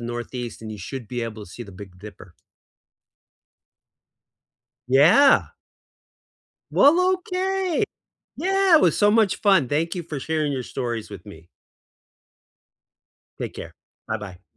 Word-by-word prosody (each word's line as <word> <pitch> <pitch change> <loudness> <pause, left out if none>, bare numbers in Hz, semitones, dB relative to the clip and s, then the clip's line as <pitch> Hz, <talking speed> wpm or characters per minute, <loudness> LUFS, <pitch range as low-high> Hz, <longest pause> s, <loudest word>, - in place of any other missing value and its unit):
Northeast 120 0 -6
and 110 -1 -7
you 105 - -9
should 120 +5 -7
be 125 +1 -4
able 110 -2 -6
to 90 - -16
see 120 - -8
the 105 - -12
Big 90 -1 -12
Dipper. 95 -2 -13 2.5
Yeah. 160 - +5 1.2
Well, 360 +6 +5
okay. 370 0 -1 0.5
Yeah, 390 -1 +3
it 310 - +5
was - - +3
so 205 0 +4
much 220 -3 +2
fun. 195 - +4
Thank 165 +4 -1
you 175 - -4
for 155 -3 -6
sharing 155 0 -1
your 130 -2 -3
stories 120 -3 -4
with 100 -3 -11
me. 85 -5 -13 1.9
Take - - -5
care. - - -9 0.3
Buh-bye. 105 -4 -6
130 Hz, 130 wpm, -23 LUFS, -, 2.5 s, Yeah